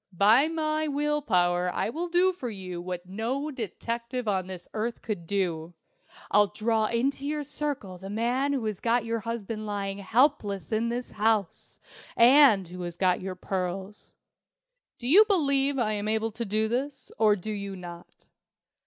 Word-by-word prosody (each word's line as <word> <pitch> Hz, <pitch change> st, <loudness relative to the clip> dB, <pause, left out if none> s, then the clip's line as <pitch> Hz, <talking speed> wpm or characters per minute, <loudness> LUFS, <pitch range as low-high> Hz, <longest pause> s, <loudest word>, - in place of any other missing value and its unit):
By 225 Hz, -, +6 dB
my 310 Hz, -1 st, -1 dB
will 295 Hz, +1 st, 0 dB
power 180 Hz, -6 st, +2 dB
I 215 Hz, -, -1 dB
will 335 Hz, +7 st, -3 dB
do 355 Hz, +2 st, +3 dB
for 265 Hz, -9 st, -5 dB
you 185 Hz, -4 st, -6 dB
what 180 Hz, 0 st, -5 dB
no 235 Hz, +10 st, -3 dB
detective 235 Hz, +1 st, -4 dB
on 190 Hz, -3 st, 0 dB
this 185 Hz, -2 st, -8 dB
earth 230 Hz, +2 st, -3 dB
could 190 Hz, -7 st, -4 dB
do. 175 Hz, -4 st, -2 dB, 0.6 s
I'll 205 Hz, 0 st, +5 dB
draw 220 Hz, +1 st, 0 dB
into 265 Hz, +5 st, -1 dB
your 300 Hz, 0 st, -2 dB
circle 280 Hz, -10 st, -4 dB
the 190 Hz, +1 st, -8 dB
man 240 Hz, +6 st, 0 dB
who 265 Hz, -5 st, -1 dB
has 210 Hz, -3 st, -2 dB
got 235 Hz, 0 st, +1 dB
your 230 Hz, 0 st, -1 dB
husband 215 Hz, -1 st, -5 dB
lying 200 Hz, -1 st, -3 dB
helpless 220 Hz, -2 st, +1 dB
in 225 Hz, +2 st, +1 dB
his 245 Hz, +1 st, -4 dB
house 215 Hz, -3 st, -1 dB, 0.4 s
and 240 Hz, -, +6 dB
who 180 Hz, +1 st, -8 dB
has 175 Hz, -1 st, -5 dB
got 185 Hz, -2 st, +2 dB
your 185 Hz, 0 st, -5 dB
pearls. 190 Hz, +2 st, -5 dB, 0.8 s
Do 240 Hz, -, -5 dB
you 375 Hz, +11 st, +8 dB
believe 280 Hz, -8 st, +2 dB
I 220 Hz, -4 st, +1 dB
am 205 Hz, 0 st, -2 dB
able 220 Hz, +1 st, 0 dB
to 235 Hz, +2 st, -4 dB
do 215 Hz, +2 st, 0 dB
this, 265 Hz, +3 st, -3 dB
or 215 Hz, -2 st, +5 dB
do 210 Hz, +2 st, -6 dB
you 200 Hz, -2 st, -5 dB
not?" 175 Hz, -1 st, -11 dB
220 Hz, 170 wpm, -27 LUFS, 195-265 Hz, 0.8 s, you